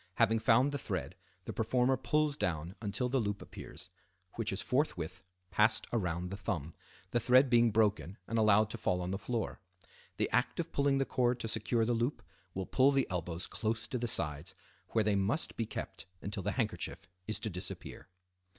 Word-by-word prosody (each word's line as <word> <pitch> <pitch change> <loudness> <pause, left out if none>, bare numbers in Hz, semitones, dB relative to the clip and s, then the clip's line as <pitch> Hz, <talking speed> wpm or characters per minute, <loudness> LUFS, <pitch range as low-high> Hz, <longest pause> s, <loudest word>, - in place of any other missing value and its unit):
Having 110 +2 +4
found 125 +6 +4
the 145 - -2
thread, 95 - -3 0.3
the - - -4
performer 125 +3 +2
pulls 150 +2 +1
down 85 - -2
until 105 +3 -1
the 130 +2 +1
loop 105 -3 -1
appears, 90 0 -10 0.4
which 115 -2 -2
is 95 - -3
forthwith 105 - -1 0.3
passed 110 +1 +4
around 90 -5 -1
the 100 - -4
thumb, 85 -5 -3 0.4
the 120 - +2
thread 130 +3 +5
being 120 -1 +6
broken 100 -5 +1
and 115 - 0
allowed 110 0 +5
to - - -5
fall 90 0 +1
on 90 +1 -3
the 95 - -2
floor. 115 -3 -2 0.6
The - - +2
act - - +1
of - - -2
pulling 140 -1 +2
the 135 - +2
cord 125 -1 +1
to - - -2
secure 115 +1 +1
the 120 - +1
loop 120 +5 -1 0.3
will 95 0 -2
pull 130 +7 +4
the 135 -2 +3
elbows 85 -1 -3
close 110 0 -2
to 125 - -2
the 120 - -1
sides, 85 -3 0 0.3
where 110 - +2
they 105 -1 +2
must 100 - 0
be 115 - -2
kept - - -6
until 100 +1 -3
the 100 +2 -1
handkerchief 105 -8 -2 0.2
is 110 - 0
to 110 - -2
disappear. 90 +1 -6
110 Hz, 190 wpm, -33 LUFS, 95-120 Hz, 0.6 s, being